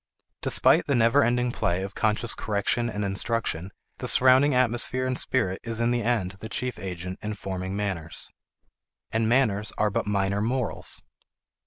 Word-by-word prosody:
Despite - - +4
the 140 - +2
never 120 +4 +4
ending 125 +1 +1
play 90 -4 -1
of 95 - -6
conscious 110 +1 0
correction 115 +3 -1
and 105 -2 -3
instruction, 100 -3 -2 0.3
the - - -3
surrounding 130 +2 +5
atmosphere 125 +1 +1
and 130 0 -1
spirit 115 -8 -1
is 115 -1 -4
in 115 +1 +1
the 120 -1 0
end 100 -6 -1
the 110 - -8
chief 125 +1 -3
agent 90 -1 -6
in 105 0 -4
forming 95 -1 -5
manners. 95 -6 -4 0.8
And 110 0 0
manners 110 -5 +1
are 105 -1 +1
but 100 - -2
minor 100 0 0
morals. 120 +1 +1
110 Hz, 160 wpm, -26 LUFS, 100-120 Hz, 0.8 s, surrounding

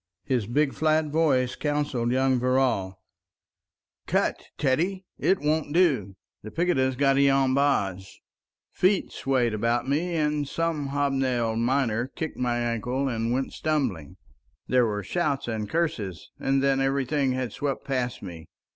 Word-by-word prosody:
His 125 -7 -1
big 140 +4 +1
flat 155 0 +2
voice 140 -5 +2
counseled 145 -5 -1
young 130 0 +2
Verrall— 125 -7 +1 1.1
"Cut, - - 0
Teddy! 175 +8 0
It 190 - +3
won't 150 0 0
do. 130 - +2 0.3
The 110 - -8
picketa's 135 -5 +1
got 135 +1 +3
i'on 135 -1 +3
bahs... 100 -10 +1 0.4
." - - -68
Feet 190 +2 +3
swayed 125 -4 0
about 115 +4 0
me, 165 +5 0
and 150 -2 0
some 165 -2 -1
hobnailed 135 -5 0
miner 120 -1 +1
kicked 160 +3 -6
my 120 -1 0
ankle 120 +3 -1
and 115 -2 -1
went 130 +2 -1
stumbling. 125 - -2 0.5
There 125 -2 +3
were 105 -1 -3
shouts 150 -7 -1
and 110 -3 -3
curses, 120 - -2
and 135 0 +1
then 135 -1 +2
everything 135 0 +1
had 125 -4 -3
swept 140 -2 -3
past 125 -4 -2
me. 85 -4 -9
135 Hz, 140 wpm, -26 LUFS, 120-145 Hz, 1.1 s, It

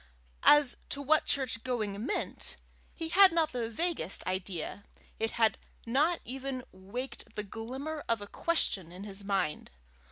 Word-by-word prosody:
As 295 -3 +6
to 280 - -3
what 305 +2 +3
church 255 -4 0
going 215 -5 -2
meant, 345 - 0 0.4
he 325 -1 -4
had 385 +2 +8
not 325 -2 +2
the 235 -3 -2
vaguest 235 - -1
idea; 185 0 -3 0.4
it 225 - +1
had 220 -3 +3 0.3
not 300 +9 +2
even 260 0 -4
waked 200 +8 -5
the 210 - -1
glimmer 260 +9 -5
of 230 -2 +3
a 205 - -6
question 200 - +1
in 185 +2 -8
his 200 -1 -8
mind. 190 -6 -1
240 Hz, 150 wpm, -31 LUFS, 200-290 Hz, 0.4 s, had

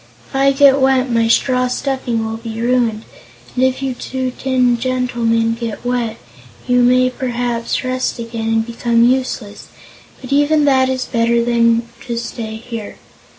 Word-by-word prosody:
If - - -11
I 275 +1 +4
get 275 0 +5
wet, 265 -1 +2
my 230 -1 +2
straw 250 +2 +2
stuffing 250 -3 -2
will 220 0 -4
be 225 -1 -7
ruined, 235 -2 +1 0.5
and 255 - 0
if 260 +1 +1
you 265 -1 -1
two 260 +1 -4
tin 250 -2 +1
gentlemen 235 -3 0
get 230 0 -6
wet, 245 -2 -1 0.5
you 250 0 +3
may 255 +1 +4
perhaps 245 -3 -2
rust 255 0 -2
again, 230 -1 -5
and 225 0 +1
become 235 0 +1
useless. 245 -4 -1 0.5
But 260 +1 -5
even 290 +1 +3
that 260 -2 +3
is 260 -1 -2
better 235 0 +1
than 230 -1 +2 0.2
to 235 -1 -3
stay 230 -2 -5
here. 225 -1 -7
245 Hz, 155 wpm, -17 LUFS, 230-260 Hz, 0.5 s, get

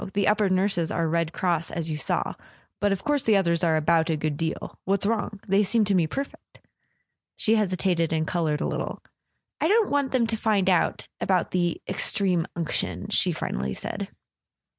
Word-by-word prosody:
The 200 -1 +2
upper 210 -1 +3
nurses 185 -3 +1
are 165 -1 0
Red 165 0 0
Cross, 170 -3 0
as 165 -1 -2
you 155 - -2
saw. 150 - -1 0.5
But 205 0 +2
of 195 -1 -2
course 290 -1 +1
the 220 -4 +3
others 170 -2 +1
are 160 -2 +3
about 165 +1 +2
a 160 - +1
good 150 0 -2
deal. 160 +2 -4
What's 195 +1 +1
wrong? 215 -1 -1
They 195 +1 +4
seem 215 +2 +2
to 200 - +1
me 175 -4 +3
perfect." 275 - -7 0.8
She 220 - +2
hesitated 185 -5 +1
and 160 -1 0
coloured 160 -4 -1
a - - 0
little. - - -4 0.6
"I - - +2
don't 430 +2 +3
want 285 -2 +1
them 255 -3 +2
to 225 0 -1
find 205 -4 +2
out—about 180 +1 0
the 175 -2 0
Extreme 185 -5 0
Unction," 170 -2 -3
she - - +3
finally 65 +1 -3
said. - - -4
185 Hz, 185 wpm, -25 LUFS, 165-210 Hz, 0.8 s, They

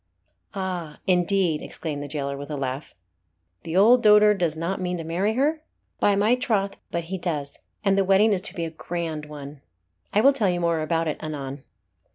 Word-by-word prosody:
"Ah! 180 -5 -4
indeed!" 180 -3 +2
exclaimed 150 -3 -5
the 145 - -5
jailer, 140 -1 -3
with 145 +1 -8
a 150 - -3
laugh. 135 +1 -4 0.7
"The 165 +2 -3
old 235 +5 +6
dotard 210 -1 +6
does 165 -3 0
not 175 +4 -2
mean 180 0 -2
to 165 - -5
marry 185 +7 0
her?" 300 +4 +1 0.4
"By 205 - +3
my 210 +4 +3
troth 210 -6 0
but 170 - -2
he 185 +3 -5
does 150 -5 -3 0.3
and 195 -1 +4
the 195 - +3
wedding 195 +3 +4
is 185 - 0
to - - -16
be 170 - -2
a 165 - -5
grand 160 -2 -4
one. 145 -1 -9 0.5
I 210 - +3
will 275 +4 +6
tell 215 -8 +1
you 175 -1 0
more 170 -2 +1
about 165 +1 0
it 155 - -3
anon." 140 -3 -5
175 Hz, 200 wpm, -24 LUFS, 155-195 Hz, 0.7 s, old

